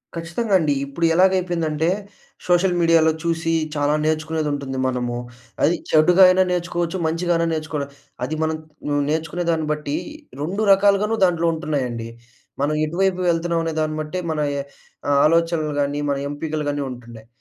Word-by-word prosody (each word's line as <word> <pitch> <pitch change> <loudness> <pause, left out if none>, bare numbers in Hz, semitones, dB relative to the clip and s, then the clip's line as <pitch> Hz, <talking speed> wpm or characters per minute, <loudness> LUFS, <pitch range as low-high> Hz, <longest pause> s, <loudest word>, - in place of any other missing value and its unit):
ఖచ్చితంగా 170 +6 -3
అండి. 150 -3 +1
ఇప్పుడు 155 +5 -2
ఎలాగైపోయిందంటే 175 -3 +2 0.6
సోషల్ 180 +1 +3
మీడియాలో 165 -1 +4
చూసి 165 0 0 0.2
చాలా 145 0 +1
నేర్చుకునేదుంటుంది 155 -4 -1
మనము. 125 -1 -2 0.5
అది 165 +4 +4
చెడుగా 175 +4 +6
అయినా 185 +1 +5
నేర్చుకోవచ్చు, 175 0 -1
మంచిగా 170 +2 0
అయినా 165 0 +1
నేర్చుకోల. 155 -2 -3 0.4
అది 150 +5 -2
మనం 160 0 0 0.3
నువ్వు 145 0 +1
నేర్చుకునే 160 +3 -2
దాన్ని 160 -2 -1
బట్టి 150 -1 -2 0.5
2 190 +8 -2
రకాలుగాను 200 +2 +4
దాంట్లో 170 -2 +1
ఉంటున్నాయండి. 130 -8 -3 0.5
మనం 150 +2 +1
ఎటువైపు 185 +3 0
వెళ్తున్నాం 170 0 0
అనే 165 -1 -2
దాన్ని 155 0 -1
బట్టే 155 +4 -4
మన 155 - -2 0.2
ఎ - - -1 0.5
ఆ - - +3
ఆలోచనలు 165 -1 +2
గాని 145 +1 -1
మన 140 - 0
ఎంపికలుగాని 145 -1 -3
ఉంటుండాయి. 115 -3 -11
160 Hz, 140 wpm, -21 LUFS, 150-175 Hz, 0.6 s, చెడుగా